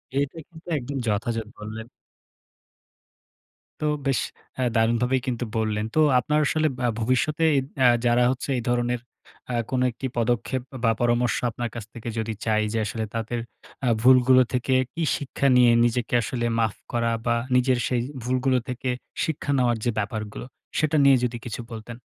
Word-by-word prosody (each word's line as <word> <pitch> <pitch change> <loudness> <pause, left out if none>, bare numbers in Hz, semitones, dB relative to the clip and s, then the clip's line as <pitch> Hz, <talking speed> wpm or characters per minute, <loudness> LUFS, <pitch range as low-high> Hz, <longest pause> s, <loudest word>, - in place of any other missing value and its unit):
এটা 140 +3 -1
কিন্তু 165 +1 -16
একদম 135 +2 -4
যথাযথ 115 +1 -1
বললেন। 110 +2 -7 1.9
তো - - 0 0.2
বেশ 135 - +2 0.4
এ্যাঁ 125 -2 +1
দারুণভাবেই 120 +3 +2
কিন্তু 120 -1 -1
বললেন। 110 -1 0
তো - - +3 0.2
আপনার 150 +6 +1
আসলে 155 +2 +2 0.2
আ - - +3
ভবিষ্যতে 130 +7 +1 0.4
আ - - +8 0.2
যারা 120 +1 +4
হচ্ছে 130 +2 -5
এই 120 - -3
ধরনের 120 0 +1 0.5
আ - - 0
কোন 130 -1 0
একটি 130 +3 -5
পদক্ষেপ 120 +2 0 0.2
বা 115 - +4
পরামর্শ 120 0 +2
আপনার 120 +1 -4
কাছ 115 - -5
থেকে 115 0 -6
যদি 110 0 -2
চাই 110 -1 +2
যে - - 0
আসলে 110 +2 -3
আ - - -41
তাদের 115 +1 -2 0.5
আ - - +1
ভুলগুলো 130 0 +6
থেকে 125 +1 0 0.2
কি 165 - -2
শিক্ষা 140 0 -1
নিয়ে 125 -1 +6
নিজেকে 120 +1 -1
আসলে 120 +1 -2
মাফ 110 -2 +1 0.2
করা 115 -1 +1
বা 120 -1 +2 0.2
নিজের 125 0 +3
সেই 125 -2 0 0.2
ভুলগুলো 130 +1 +1
থেকে 125 +1 -3 0.4
শিক্ষা 145 -2 -2
নেওয়ার 120 -2 +2
যে 120 - +2
ব্যাপারগুলো, 110 +2 -4 0.3
সেটা 155 0 +1
নিয়ে 135 -1 +7
যদি 120 -1 -1
কিছু 120 +1 -5
বলতেন। 115 +1 -7
120 Hz, 165 wpm, -25 LUFS, 115-130 Hz, 1.9 s, আ